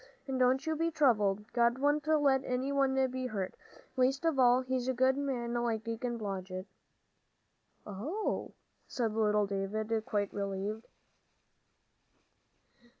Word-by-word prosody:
And 265 -1 -2
don't 260 +3 +3
you 320 0 0
be 330 +2 0
troubled; 210 -9 +2
God 235 0 +3
wouldn't 290 +2 +1
let 285 -4 +3
any 255 +2 -1
one 275 -1 +2 0.2
be 255 0 -3
hurt, 195 -6 -3 0.4
least 265 +3 +1
of 320 -5 +1
all 250 0 +5
a 260 0 0
good 260 +1 +3
man 260 -4 -2
like 235 -2 -1
Deacon 235 +1 -3
Blodgett." 190 -3 -5 1.2
"Oh," 280 - -3 0.3
said 230 -4 -1
little 210 -1 +2
David, 215 +3 -2
quite 205 -2 -1
relieved. 200 +2 -3
245 Hz, 125 wpm, -32 LUFS, 210-265 Hz, 1.2 s, all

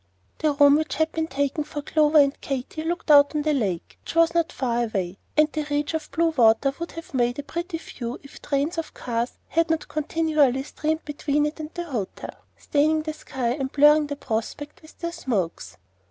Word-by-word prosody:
The 305 -2 +2
room 285 0 +6
which 310 0 -2
had 315 +1 +1
been 320 0 -2
taken 285 +1 -1
for 295 -1 -6
Clover 305 +1 +3
and 280 -1 +4
Katy 275 +3 -4
looked 335 -1 -1
out 285 +1 +7
on 300 - 0
the 305 0 +2
lake, 200 -11 -2
which - - -8
was 330 0 +4
not 335 -1 +1
far 240 -2 0
away; 190 -4 -3 0.2
and 305 0 +6
the 310 - -2
reach 290 +1 -1
of 315 -1 -3
blue 330 +4 +2
water 250 0 +4
would 335 - -5
have 330 0 -9
made 245 -1 +1
a 285 - -4
pretty 340 +3 -4
view 240 -6 -7
if 280 - -13
trains 295 +4 -1
of 325 - -6
cars 235 0 -3
had 330 0 +1
not 320 -1 0
continually 305 -4 +1
steamed 315 +2 -3
between 295 0 0
it 300 +1 -4
and 305 -1 -5
the 345 - -3
hotel, 245 - -5 0.2
staining 310 +2 +1
the 310 0 -3
sky 260 -5 -3
and 265 +1 -2
blurring 295 +1 +6
the 285 - -4
prospect 280 +4 -4
with 315 - -17
their 340 0 -4
smokes. 205 - -3
295 Hz, 205 wpm, -24 LUFS, 265-315 Hz, 0.2 s, out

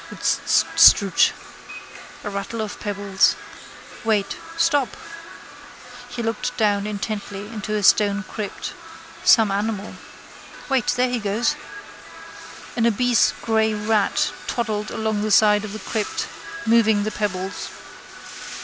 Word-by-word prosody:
Rtststr! 200 -3 +4 0.9
A 210 - -4
rattle 200 +3 -5
of 215 -1 -4
pebbles. 200 -2 +1 0.7
Wait. 210 -3 0 0.2
Stop! 290 -6 +1 1.1
He 245 -1 -5
looked 225 +2 -3
down 205 -2 +1
intently 205 -1 -5
into 215 -1 -4
a 210 - -1
stone 205 +1 +4
crypt. 210 -1 -6 0.5
Some 220 -4 +5
animal. 205 0 -2 0.8
Wait. 265 -4 +1
There 250 +1 +2
he 245 - -1
goes. 210 +3 0 1.2
An 235 -1 +2
obese 240 +1 +3
grey 220 -1 +1
rat 210 0 +1 0.2
toddled 215 -3 -2
along 220 -1 -2
the 215 - -1
side 210 0 +5
of 215 - -6
the 215 - -6
crypt, 215 -1 -3 0.4
moving 220 -2 +4
the 215 - -2
pebbles. 195 -2 -3
215 Hz, 115 wpm, -22 LUFS, 205-225 Hz, 1.2 s, Some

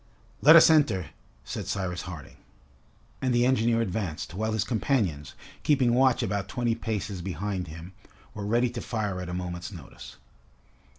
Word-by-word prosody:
"Let 160 +3 +9
us 165 0 +8
enter," 110 - +2 0.3
said - - -6
Cyrus 90 -2 -2
Harding. 85 -6 -9 0.8
And 130 -2 +1
the 120 0 +4
engineer 115 -2 +2
advanced, 95 -7 -3
while 110 +3 -2
his 110 - +1
companions, 105 - -1 0.3
keeping 130 -5 +3
watch 130 0 +3
about 100 -2 -2
twenty 120 +1 -1
paces 105 -4 -4
behind 95 +1 -3
him, 85 +4 -10 0.4
were 105 - -6
ready 120 +2 +2
to 120 -1 -5
fire 105 -5 -3
at 90 - -6
a - - -4
moment's 90 0 -5
notice. 85 -8 -11
105 Hz, 155 wpm, -27 LUFS, 90-120 Hz, 0.8 s, Let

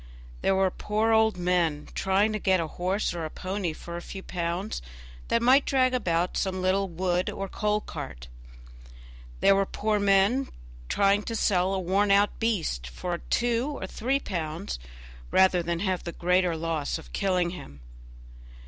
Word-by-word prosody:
There 195 - +2
were 190 -1 +2
poor 215 +4 0
old 220 -2 +4
men, 175 -4 0
trying 195 +3 +2
to 215 - -2
get 190 -2 +2
a 165 - 0
horse 185 +6 -1
or 170 -1 -4
a 155 - -3
pony 185 +1 -3
for 170 +2 -8
a - - -6
few 190 +2 -8
pounds, 175 - -3 0.5
that 230 - +1
might 265 +3 +6
drag 255 -2 +2
about 180 -7 0
some 185 -1 -1
little 190 +2 +1
wood 180 +1 0
or 195 - -4
coal 210 +2 0
cart. - - -8 1.1
There 195 - +6
were 195 0 +1
poor 210 0 0
men 200 +7 +3 0.4
trying 200 0 +3
to 230 - -3
sell 185 -4 +2
a - - -1
worn 195 +3 +1
out 200 +1 +3
beast 170 - -1
for 170 - -4
two 240 +4 0
or - - -4
three 255 +8 -1
pounds, 170 - -4 0.5
rather 190 -1 +4
than 170 0 -2
have 190 -3 -1
the 170 - -5
greater 180 -1 +1
loss 160 -2 -2
of 160 - -13
killing 180 -3 +1
him. 70 - -10
190 Hz, 165 wpm, -27 LUFS, 175-210 Hz, 1.1 s, might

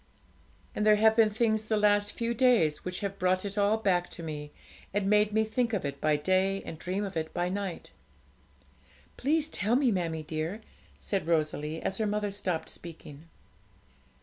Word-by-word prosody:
And 210 - -1
there 215 0 +6
have 220 +1 +4
been 225 -1 +5
things 220 0 +1
the 215 - +1
last 205 0 +3
few 235 0 -2
days 235 -11 +3
which 180 0 -4
have 200 -1 -4
brought 185 +1 +1
it 200 0 -4
all 205 +1 +3
back 185 -5 +1
to 170 - -9
me, 150 -2 -6 0.4
and 205 -1 +1
made 210 +1 +4
me 220 +1 +2
think 235 +1 -1
of 195 -7 -1
it 140 0 -5
by 155 -1 +3
day 190 +5 +1
and 160 - -8
dream 185 +4 -2
of 195 - -7
it 160 -1 -2
by 175 +1 0
night.' 195 -2 -4 1.2
'Please 305 +3 +1
tell 225 -6 +1
me, 260 -2 +3
mammie 165 -5 -2
dear,' 160 +7 -4 0.4
said 195 -5 -3
Rosalie, 155 -1 -1
as 190 - -2
her 215 - +1
mother 205 0 -1
stopped 185 -5 -3
speaking. 160 -3 -10
195 Hz, 180 wpm, -29 LUFS, 165-215 Hz, 1.2 s, there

